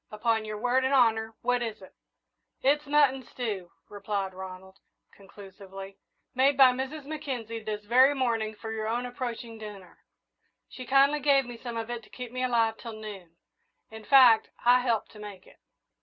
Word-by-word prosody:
"Upon 220 Hz, +1 st, -1 dB
your 215 Hz, 0 st, -5 dB
word 250 Hz, +4 st, +1 dB
and 265 Hz, +1 st, +2 dB
honour, 225 Hz, -3 st, +2 dB
what 245 Hz, 0 st, +1 dB
is 225 Hz, -3 st, -4 dB
it?" 190 Hz, -, -15 dB, 0.7 s
"It's 290 Hz, +2 st, +2 dB
mutton 285 Hz, -2 st, +3 dB
stew," 215 Hz, -8 st, -5 dB, 0.2 s
replied 200 Hz, -1 st, -4 dB
Ronald, 190 Hz, +1 st, -10 dB, 0.3 s
conclusively, 195 Hz, 0 st, -12 dB, 0.3 s
"made 265 Hz, +2 st, +3 dB
by 265 Hz, -2 st, +8 dB
Mrs. 265 Hz, +4 st, -5 dB
Mackenzie 260 Hz, -7 st, -5 dB
this 210 Hz, -1 st, -5 dB
very 260 Hz, +6 st, +5 dB
morning 225 Hz, -5 st, -1 dB
for 220 Hz, +1 st, -7 dB
your 220 Hz, -1 st, -3 dB
own 240 Hz, +2 st, -1 dB
approaching 240 Hz, -2 st, -6 dB
dinner. 205 Hz, -4 st, -11 dB, 0.7 s
She 255 Hz, -1 st, -10 dB
kindly 275 Hz, +3 st, +4 dB
gave 275 Hz, -2 st, +3 dB
me 245 Hz, 0 st, -8 dB
some 235 Hz, 0 st, -7 dB
of 225 Hz, +1 st, -4 dB
it 240 Hz, -1 st, -4 dB
to 215 Hz, -, -19 dB
keep 250 Hz, -2 st, -8 dB
me 255 Hz, 0 st, -3 dB
alive 230 Hz, -3 st, +1 dB
till 230 Hz, -2 st, -8 dB
noon. 200 Hz, -6 st, -10 dB, 0.6 s
In 220 Hz, 0 st, -10 dB
fact, 250 Hz, -2 st, +6 dB, 0.2 s
I 245 Hz, +1 st, +6 dB
helped 235 Hz, -4 st, -1 dB
to 210 Hz, -, -14 dB
make 205 Hz, -3 st, -10 dB
it." -, -, -20 dB
230 Hz, 170 wpm, -28 LUFS, 210-255 Hz, 0.7 s, by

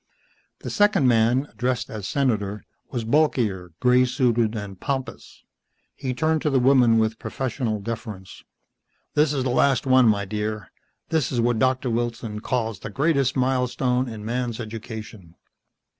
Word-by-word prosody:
The -, -, -5 dB
second 205 Hz, -, +3 dB
man, 120 Hz, +3 st, +3 dB
addressed 125 Hz, -1 st, -2 dB
as 105 Hz, -3 st, -5 dB
Senator, 105 Hz, -7 st, -1 dB, 0.3 s
was 120 Hz, -4 st, -3 dB
bulkier, 115 Hz, -, +1 dB
grey 125 Hz, 0 st, +4 dB
suited 120 Hz, -3 st, +1 dB
and 100 Hz, -3 st, -6 dB
pompous. 135 Hz, +3 st, -5 dB, 0.5 s
He 130 Hz, -2 st, -4 dB
turned 160 Hz, +2 st, +1 dB
to 150 Hz, -, +1 dB
the 135 Hz, -, +2 dB
woman 125 Hz, -3 st, +5 dB
with 110 Hz, 0 st, 0 dB
professional 120 Hz, -4 st, -3 dB
deference. 105 Hz, -3 st, -7 dB, 0.7 s
"This 150 Hz, -1 st, +3 dB
is 135 Hz, -3 st, -1 dB
the 130 Hz, -, 0 dB
last 135 Hz, +1 st, +2 dB
one, 130 Hz, -2 st, +5 dB
my 100 Hz, -2 st, +2 dB
dear. 105 Hz, +2 st, -4 dB, 0.4 s
This 160 Hz, -7 st, 0 dB
is 125 Hz, -, -1 dB
what 120 Hz, -1 st, +1 dB
Doctor 130 Hz, 0 st, +1 dB
Wilson 115 Hz, -2 st, -3 dB
calls 115 Hz, -3 st, -2 dB
the -, -, -7 dB
greatest 140 Hz, -3 st, +1 dB
milestone 125 Hz, 0 st, 0 dB
in 110 Hz, -2 st, -8 dB
man's 120 Hz, 0 st, -2 dB
education." 110 Hz, -5 st, -8 dB
120 Hz, 145 wpm, -24 LUFS, 110-130 Hz, 0.7 s, woman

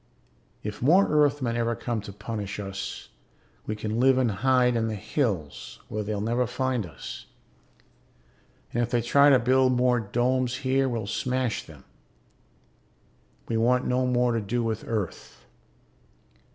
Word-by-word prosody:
If 105 Hz, -1 st, -6 dB
more 175 Hz, +10 st, +5 dB
Earthmen 145 Hz, -5 st, +2 dB
ever 115 Hz, 0 st, 0 dB
come 115 Hz, -2 st, -3 dB
to 100 Hz, -, -9 dB
punish 105 Hz, 0 st, -5 dB
us, 100 Hz, -1 st, -6 dB, 0.6 s
we 110 Hz, -, -2 dB
can 110 Hz, +1 st, -3 dB
live 130 Hz, +1 st, +5 dB
and 125 Hz, -4 st, +2 dB
hide 125 Hz, +3 st, +2 dB
in 115 Hz, -1 st, 0 dB
the 110 Hz, -, -2 dB
hills 100 Hz, -, -3 dB
where 110 Hz, -, -3 dB
they'll 105 Hz, 0 st, -3 dB
never 120 Hz, +4 st, 0 dB
find 125 Hz, -4 st, -1 dB
us. 75 Hz, -5 st, -9 dB, 1.5 s
And 120 Hz, -, +1 dB
if 120 Hz, -, 0 dB
they 120 Hz, -1 st, +1 dB
try 140 Hz, +4 st, +5 dB
to 135 Hz, -, +7 dB
build 130 Hz, +1 st, +3 dB
more 125 Hz, 0 st, +3 dB
domes 125 Hz, +3 st, 0 dB
here 135 Hz, +1 st, +2 dB
we'll 115 Hz, -4 st, -3 dB
smash 125 Hz, +2 st, -1 dB
them. -, -, -15 dB, 1.6 s
We 115 Hz, -, -1 dB
want 125 Hz, +2 st, +2 dB
no 125 Hz, 0 st, +1 dB
more 125 Hz, -1 st, +2 dB
to 115 Hz, -1 st, 0 dB
do 115 Hz, +4 st, -1 dB
with 110 Hz, -1 st, -3 dB
Earth. 105 Hz, -6 st, -5 dB
120 Hz, 150 wpm, -26 LUFS, 110-130 Hz, 1.6 s, to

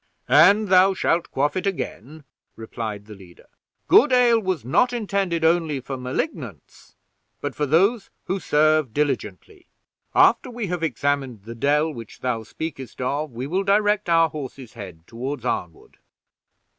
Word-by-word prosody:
"And 200 Hz, +7 st, +5 dB
thou 190 Hz, +1 st, +5 dB
shalt 170 Hz, -2 st, 0 dB
quaff 145 Hz, +2 st, -1 dB
it 185 Hz, +1 st, -2 dB
again," 155 Hz, -, -5 dB, 0.3 s
replied 110 Hz, -2 st, -6 dB
the 105 Hz, -, -11 dB
leader. 90 Hz, -5 st, -16 dB, 0.4 s
"Good 290 Hz, -, +6 dB
ale 245 Hz, -2 st, +4 dB
was 185 Hz, -, -3 dB
not 245 Hz, -, +2 dB
intended 195 Hz, -7 st, -1 dB
only 160 Hz, -4 st, +1 dB
for 135 Hz, +1 st, -6 dB
Malignants, 130 Hz, -, -6 dB, 0.4 s
but -, -, -4 dB
for 150 Hz, -, -2 dB
those 195 Hz, -, +2 dB, 0.2 s
who 190 Hz, +1 st, -2 dB
serve 155 Hz, -6 st, +2 dB
diligently. 345 Hz, -, -3 dB, 0.5 s
After -, -, +4 dB
we 240 Hz, -2 st, -5 dB
have 180 Hz, -2 st, -3 dB
examined 140 Hz, -6 st, -2 dB
the 115 Hz, +2 st, -8 dB
dell 150 Hz, +6 st, +1 dB
which 115 Hz, -4 st, -11 dB
thou 125 Hz, -3 st, -1 dB
speakest 135 Hz, +1 st, -7 dB
of, 140 Hz, +4 st, -2 dB
we 120 Hz, +2 st, -5 dB
will 180 Hz, +7 st, -1 dB
direct 205 Hz, 0 st, +2 dB
our 165 Hz, -1 st, +4 dB
horses' 135 Hz, -5 st, -8 dB
heads 95 Hz, -8 st, -10 dB
toward 125 Hz, +3 st, -6 dB
Arnwood." 85 Hz, -8 st, -4 dB
150 Hz, 145 wpm, -23 LUFS, 125-190 Hz, 0.5 s, Good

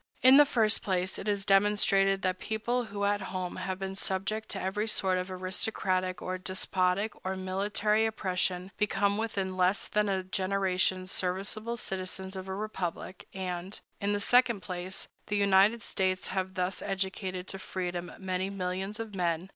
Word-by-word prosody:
In 260 Hz, +2 st, +9 dB
the 295 Hz, -1 st, +8 dB
first 225 Hz, -5 st, +2 dB
place, 185 Hz, -1 st, -1 dB
it -, -, -6 dB
has 200 Hz, -2 st, 0 dB
demonstrated 195 Hz, -1 st, +4 dB
that 185 Hz, -1 st, 0 dB
people 235 Hz, +3 st, -1 dB
who 200 Hz, -1 st, -4 dB
at 205 Hz, 0 st, +1 dB
home 185 Hz, -2 st, -4 dB
have 185 Hz, 0 st, -3 dB
been 195 Hz, 0 st, -4 dB
subject 200 Hz, +3 st, -2 dB
to 195 Hz, -, -4 dB
every 200 Hz, +4 st, -1 dB
sort 190 Hz, -3 st, +2 dB
of 180 Hz, +1 st, -4 dB
aristocratic 185 Hz, 0 st, -1 dB
or 185 Hz, 0 st, -3 dB
despotic 185 Hz, +2 st, 0 dB
or 190 Hz, 0 st, -2 dB
military 205 Hz, +3 st, +1 dB
oppression 185 Hz, -3 st, -1 dB
become 205 Hz, 0 st, +1 dB
within 195 Hz, -4 st, -2 dB
less 185 Hz, +2 st, +2 dB
than 210 Hz, -1 st, +1 dB
a 190 Hz, -1 st, 0 dB
generation 185 Hz, -1 st, +1 dB
serviceable 195 Hz, +6 st, 0 dB
citizens 190 Hz, -1 st, -3 dB
of 190 Hz, 0 st, -6 dB
a 190 Hz, -, -3 dB
republic; 190 Hz, -3 st, -4 dB
and, 185 Hz, 0 st, -4 dB, 0.2 s
in 200 Hz, 0 st, 0 dB
the 205 Hz, -, 0 dB
second 240 Hz, -1 st, +4 dB
place, 180 Hz, 0 st, -5 dB, 0.2 s
the 205 Hz, -, 0 dB
United 200 Hz, +3 st, +4 dB
States 185 Hz, -1 st, 0 dB
have 190 Hz, 0 st, -2 dB
thus 185 Hz, +1 st, -1 dB
educated 190 Hz, -1 st, -3 dB
to 195 Hz, -, -5 dB
freedom 180 Hz, -2 st, -4 dB
many 185 Hz, 0 st, -2 dB
millions 190 Hz, +2 st, -3 dB
of 225 Hz, -2 st, -5 dB
men. 175 Hz, -1 st, -1 dB
190 Hz, 165 wpm, -30 LUFS, 185-205 Hz, 0.2 s, In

